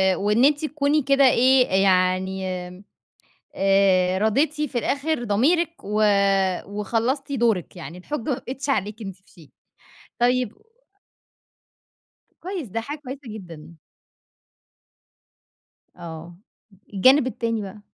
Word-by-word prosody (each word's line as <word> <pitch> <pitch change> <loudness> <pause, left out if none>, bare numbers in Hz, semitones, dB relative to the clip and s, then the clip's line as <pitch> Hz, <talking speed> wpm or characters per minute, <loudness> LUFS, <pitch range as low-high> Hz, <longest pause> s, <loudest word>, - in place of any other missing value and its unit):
وإن 210 +7 +2
أنتِ 295 +1 +2
تكوني 300 0 +1
كده 275 0 +3
إيه 255 -1 +4
أ - - +2
يعني 190 0 +2 0.2
آمم 180 +2 -13 0.7
آآ 190 -1 +3
راضيتِ 265 +8 +2
في 275 -5 -2
الآخر 285 +1 -1
ضميرِك 300 - +2
و 210 +1 0 0.6
وخلّصتِ 230 +8 -2
دورِك 230 - 0
يعني 170 0 -9
الحُجة 295 +10 -5
ما 255 +2 -1
بقتش 270 +3 -7
عليكِ 215 -2 -1
أنتِ 195 -3 -7
في 190 - -28
شيء 160 -5 -18 0.7
طيب 245 -2 +1
و - - -28 1.8
كويس. 360 - -5
ده 225 +4 -3
حاجة 290 +6 -6
كويسة 275 -1 -9
جدًا. 170 -7 -10 2.2
آه. 170 0 -9 0.6
الجانب 260 +7 +5
التاني 230 -2 -2
بقى؟ 200 +2 -9
225 Hz, 115 wpm, -23 LUFS, 190-275 Hz, 2.2 s, الجانب